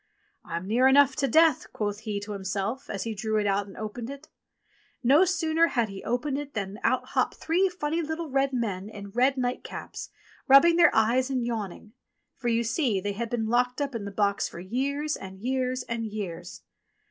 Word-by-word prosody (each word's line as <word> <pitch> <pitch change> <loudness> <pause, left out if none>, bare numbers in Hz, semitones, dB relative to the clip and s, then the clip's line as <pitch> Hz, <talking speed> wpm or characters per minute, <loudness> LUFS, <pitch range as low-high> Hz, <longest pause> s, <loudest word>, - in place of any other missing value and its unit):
"I'm 170 +1 -5
near 240 +6 +3
enough 270 0 +5
to 275 - +1
death," 315 +2 +4
quoth 205 -1 -2
he 215 -2 -3
to 205 +1 -7
himself, 200 +5 -3
as 200 - -3
he 225 - -3
drew 215 +1 -1
it 210 - +1
out 200 0 +1
and 195 - -12
opened 220 +3 -5
it. 280 +3 -9 0.7
And 240 - +1
no 305 +7 +7
sooner 330 -2 +2
had 235 -8 0
he 195 -1 -8
opened 265 +4 -1
it 290 -2 -8
than 200 0 -4
out 255 - +1
hopped - - 0
three 365 +4 +1
funny 330 -2 -2
little 320 +1 -4
red 275 0 +1
men 210 -6 -2
in 200 -2 -9
red 255 +5 +2
night 250 -1 -1
caps - - -7 0.4
rubbing 335 +5 +7
their 345 0 +7
eyes 240 +4 +3
and 255 -3 -1
yawning; 215 -2 -5 0.4
for, 240 -2 -2
see 240 +1 0
you, 190 - 0
they 205 - -1
had 230 +3 -4
been 230 -2 -1
locked 245 +3 +1
up 280 -2 -2
in 225 -3 -4
the - - -4
box 200 0 0
for - - -9
years, 280 +10 -2
and 190 0 -9
years, 255 +2 -1
and 235 -2 -3
years. 180 -5 -6
240 Hz, 205 wpm, -27 LUFS, 205-275 Hz, 0.7 s, no